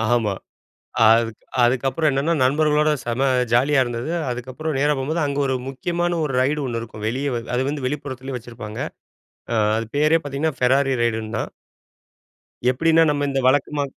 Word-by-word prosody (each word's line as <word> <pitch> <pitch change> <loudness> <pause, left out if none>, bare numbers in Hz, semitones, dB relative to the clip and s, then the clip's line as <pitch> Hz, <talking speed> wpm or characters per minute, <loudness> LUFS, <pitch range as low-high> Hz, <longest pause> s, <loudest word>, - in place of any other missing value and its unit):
ஆமா. 110 -5 +2 0.7
அதுக் 115 0 +3 0.3
அதுக்கப்புறம் 130 +5 +2
என்னன்னா, 140 +5 +1
நண்பர்களோட 150 +2 +3
செம 125 +3 0 0.3
ஜாலியா 135 +3 +4
இருந்தது. 120 +5 -4 0.2
அதுக்கப்புறம் 130 +5 -4
நேரா 145 +1 +3
போம்போது 155 +5 -1
அங்க 140 0 -2
ஒரு 130 - 0
முக்கியமான 175 +5 -1
ஒரு 140 -3 -2
ரைடு 145 +3 +1
1 115 -2 -2
இருக்கும். 110 -2 -9
வெளியே 135 +5 -1
வ - - 0 0.2
அது 125 - +1
வந்து 145 -3 -3
வெளிப்புறத்திலேயே 135 -2 -5
வச்சிருப்பாங்க. 115 -2 -9 0.7
அ - - +1 0.2
அது 115 0 -2
பேரே 155 +2 +4
பார்த்தீங்கன்னா, 145 +2 -2
ஃபெராரி 135 +2 +3
ரைடுன்னு 110 -2 -1
தான். - - -3 1.2
எப்டினா, 165 +5 +3
நம்ம 145 -1 0
இந்த 135 0 0
வழக்கமா 145 +1 +1
135 Hz, 150 wpm, -22 LUFS, 120-150 Hz, 1.2 s, ஜாலியா